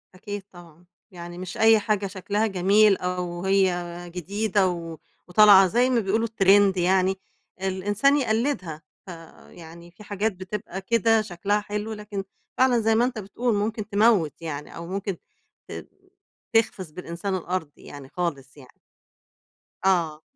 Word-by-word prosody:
أكيد 205 Hz, +1 st, -7 dB
طبعًا، 175 Hz, -1 st, -16 dB, 0.3 s
يعني 175 Hz, 0 st, -9 dB
مش 185 Hz, 0 st, -7 dB
أي 220 Hz, 0 st, +5 dB
حاجة 205 Hz, -1 st, -1 dB
شكلها 205 Hz, +3 st, -2 dB
جميل 200 Hz, +2 st, +4 dB
أو 180 Hz, 0 st, -4 dB
هي 190 Hz, -2 st, +2 dB, 0.3 s
جديدة 200 Hz, +2 st, 0 dB, 0.6 s
وطالعة، 195 Hz, 0 st, +7 dB
زي 245 Hz, +6 st, +2 dB
ما 245 Hz, -2 st, +2 dB
بيقولوا 220 Hz, +3 st, 0 dB
الtrend 200 Hz, -2 st, +4 dB
يعني، 190 Hz, +1 st, +2 dB, 0.4 s
الإنسان 205 Hz, +9 st, +1 dB
يقلِّدها. 220 Hz, -, -1 dB, 0.3 s
فيعني 170 Hz, 0 st, -13 dB
في 210 Hz, +4 st, -15 dB
حاجات 205 Hz, +2 st, -1 dB
بتبقى 190 Hz, +1 st, -7 dB
كده 225 Hz, +1 st, +2 dB
شكلها 205 Hz, +1 st, -1 dB
حلو، 210 Hz, +1 st, -4 dB
لكن 210 Hz, -2 st, -6 dB, 0.3 s
فعلًا 255 Hz, -2 st, +4 dB
زي 220 Hz, 0 st, +2 dB
ما 240 Hz, +2 st, +3 dB
أنتَ 250 Hz, -3 st, -3 dB
بتقول 215 Hz, +3 st, -2 dB
ممكن 215 Hz, +1 st, -3 dB
تموِّت 200 Hz, -8 st, +2 dB
يعني، 150 Hz, -2 st, -6 dB
أو 170 Hz, 0 st, -8 dB
ممكن 195 Hz, -1 st, -4 dB, 0.5 s
ت -, -, -7 dB, 0.7 s
تخسِف 195 Hz, -7 st, 0 dB
بالإنسان 180 Hz, +3 st, -5 dB
الأرض 175 Hz, -4 st, -3 dB
يعني 140 Hz, -2 st, -12 dB
خالص 145 Hz, -6 st, -4 dB
يعني. 130 Hz, -3 st, -15 dB, 1.2 s
آه، 165 Hz, -5 st, +1 dB
195 Hz, 135 wpm, -24 LUFS, 175-215 Hz, 1.2 s, وطالعة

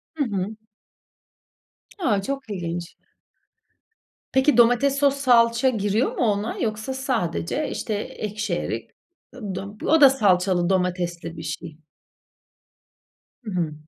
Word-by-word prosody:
Hı 305 Hz, -, 0 dB
hı. 205 Hz, -3 st, -3 dB, 1.4 s
A! 220 Hz, -, +1 dB
Çok 275 Hz, +3 st, -5 dB
ilginç. 175 Hz, -3 st, -5 dB, 1.4 s
Peki, 265 Hz, 0 st, +3 dB
domates, 245 Hz, +4 st, +4 dB
sos, 280 Hz, -1 st, +3 dB
salça 245 Hz, -2 st, +4 dB
giriyor 215 Hz, +1 st, 0 dB
mu -, -, +1 dB
ona? 210 Hz, 0 st, 0 dB
Yoksa 220 Hz, +2 st, -2 dB
sadece, 255 Hz, -, -2 dB
işte, 220 Hz, -, -3 dB
ekşi 210 Hz, +1 st, -4 dB
erik -, -, -4 dB, 0.5 s
ı 210 Hz, -7 st, -6 dB
dom 200 Hz, +3 st, -7 dB
O 320 Hz, 0 st, +4 dB
da 280 Hz, -, +10 dB
salçalı 185 Hz, -7 st, +2 dB
domatesli 175 Hz, -3 st, -1 dB
bir 160 Hz, -, -7 dB
şey. 155 Hz, +1 st, -6 dB, 1.7 s
Hı 215 Hz, -, -6 dB
hı. 170 Hz, -5 st, -1 dB
210 Hz, 115 wpm, -23 LUFS, 180-260 Hz, 1.7 s, da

